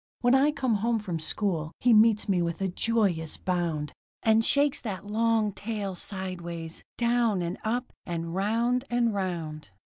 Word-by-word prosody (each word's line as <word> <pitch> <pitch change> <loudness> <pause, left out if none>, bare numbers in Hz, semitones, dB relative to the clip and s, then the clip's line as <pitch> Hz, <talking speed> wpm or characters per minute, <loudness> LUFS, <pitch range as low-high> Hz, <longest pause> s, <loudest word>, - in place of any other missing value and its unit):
When 245 +1 +4
I 270 +2 +5
come 260 -7 0
home 230 +3 +1
from 185 -6 -4
school 160 -1 -1
he 245 -1 +4
meets 215 0 +5
me 185 -3 +2
with 170 -1 -2
a 195 - 0
joyous 190 -5 0
bound, 170 -5 -2 0.3
And 220 0 +4
shakes 285 +3 +3
that 195 -4 -5
long 220 0 +1
tail 205 -1 -4
sideways, 175 -3 -4
down 235 -5 +2
and 175 +3 -4
up, 240 +3 -2
and 165 -1 -4
round 230 +6 +1
and 240 -2 +1
round. 165 - -4
205 Hz, 155 wpm, -27 LUFS, 175-230 Hz, 0.3 s, I